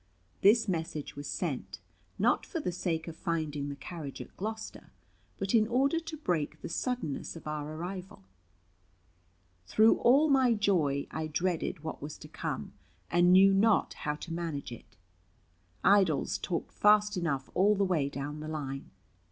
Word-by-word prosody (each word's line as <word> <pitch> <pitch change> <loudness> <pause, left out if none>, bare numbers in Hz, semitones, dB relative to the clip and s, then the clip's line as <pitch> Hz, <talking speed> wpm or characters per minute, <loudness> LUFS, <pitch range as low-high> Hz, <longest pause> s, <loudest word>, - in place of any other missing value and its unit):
This 225 +3 +5
message 165 -5 -3
was 145 0 -6
sent, - - -3 0.4
not - - +2
for 335 - -4
the 235 - -2
sake 170 -2 -2
of 165 - -6
finding 155 -5 -2
the 140 - -5
carriage 145 0 -7
at - - -10
Gloucester, 220 +2 -6 0.5
but 195 0 -2
in 220 -2 +5
order 275 +7 +2
to 320 -1 -7
break 175 - -2
the - - -4
suddenness 230 - -3
of 165 - -10
our 150 0 -4
arrival. 180 - -7 1.4
Through 220 +1 +5
all 275 +6 +5
my 260 -5 +4
joy 165 -10 +1
I 160 0 -3
dreaded 170 0 -2
what 160 - -5
was 145 +1 -6
to - - -11
come, - - -5 0.4
and 175 +1 +5
knew 195 +1 +7
not 210 +2 +3
how 150 0 -3
to 165 +2 -7
manage 165 -6 -4
it. 110 -2 -12 0.9
Idols 190 -8 +3
talked 170 - -3
fast 210 0 +4
enough 150 -7 -2
all 205 +3 +4
the 200 0 +2
way 160 -7 +1
down 145 +2 -5
the 155 - -6
line. 140 -3 -5
175 Hz, 160 wpm, -30 LUFS, 150-210 Hz, 1.4 s, knew